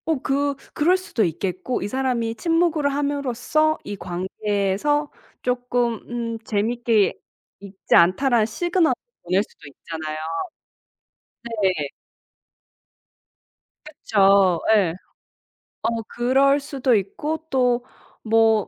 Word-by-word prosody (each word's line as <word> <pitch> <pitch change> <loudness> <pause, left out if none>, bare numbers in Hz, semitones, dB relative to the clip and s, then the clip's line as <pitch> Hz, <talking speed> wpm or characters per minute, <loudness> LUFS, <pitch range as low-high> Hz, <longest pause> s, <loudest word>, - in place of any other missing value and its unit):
어 320 -4 0
그 280 +1 0 0.2
그럴 350 +5 +3
수도 370 -11 -1
있겠고 185 +7 -2
이 - - -2
사람이 245 -1 -1
침묵을 330 0 +1
함으로써 285 +2 0
이 205 - -5
관계에서 200 +10 -1 0.3
쪼끔 245 -2 0
음 230 -1 -3
'재밌게 225 0 +1 0.5
있지 195 -1 -2
않다.'라는 220 +7 +4
시그널을 345 - +1 0.3
보낼 185 +3 +2
수 - - -20
있잖아요. 155 +1 -6 1.4
네. 180 -7 +1 2.0
그쵸. 195 - +3
예. 185 -6 +2 0.9
어 230 0 0
그럴 270 +4 +3
수도 275 -3 0
있고 220 +11 -2
또 250 -2 +2 0.4
뭐 225 -2 +3
235 Hz, 195 characters per minute, -23 LUFS, 200-280 Hz, 2.0 s, 않다.'라는